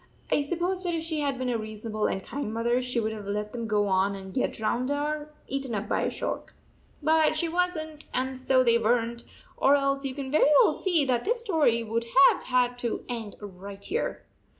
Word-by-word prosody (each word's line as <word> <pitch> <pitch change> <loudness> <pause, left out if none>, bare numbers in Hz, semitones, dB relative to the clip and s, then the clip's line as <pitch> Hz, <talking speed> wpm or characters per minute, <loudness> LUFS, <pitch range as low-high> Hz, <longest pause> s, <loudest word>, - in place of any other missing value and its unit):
I - - +3
suppose 350 +5 -1
that 350 -2 0
if 320 - -2
she 320 -2 -3
had 280 -2 0
been 255 -1 -1
a 230 - 0
reason 215 +1 -6
able 215 0 +1
and 190 - -2
kind 280 -6 -4
mother 235 +2 +1
she 250 -1 -1
would 220 -1 -1
have 210 -2 -7
let 210 +1 -2
them 230 -2 -4
go 210 -1 +2
on 195 0 +2
and 190 -1 -9
get 255 - 0
drowned 240 +4 -1
or 295 +1 -2 0.2
eaten 270 -3 -3
up 205 +1 -3
by - - 0
a - - +1
shark. - - -5 0.5
But 315 0 +3
she 335 - 0
was 360 +1 0
n 310 -1 -7
t, - - -17
and 260 +1 -1
so 260 0 +3
they 235 -1 +4
were 230 +2 +4
n 235 0 -4
t, 235 - -15 0.3
or 280 - +5
else 275 0 +1
you 265 -2 -3
can 275 -2 -5
very 300 0 +5
well - - +3
see 340 -7 +1
that 245 -2 +1
this 470 +2 0
story 310 - +2
would 230 +1 -2 0.2
have - - -4
had 245 -1 +1
to 235 -2 -3
end 225 -4 -5
right 200 0 -9
here. 455 +6 -2
250 Hz, 235 wpm, -27 LUFS, 220-300 Hz, 0.5 s, or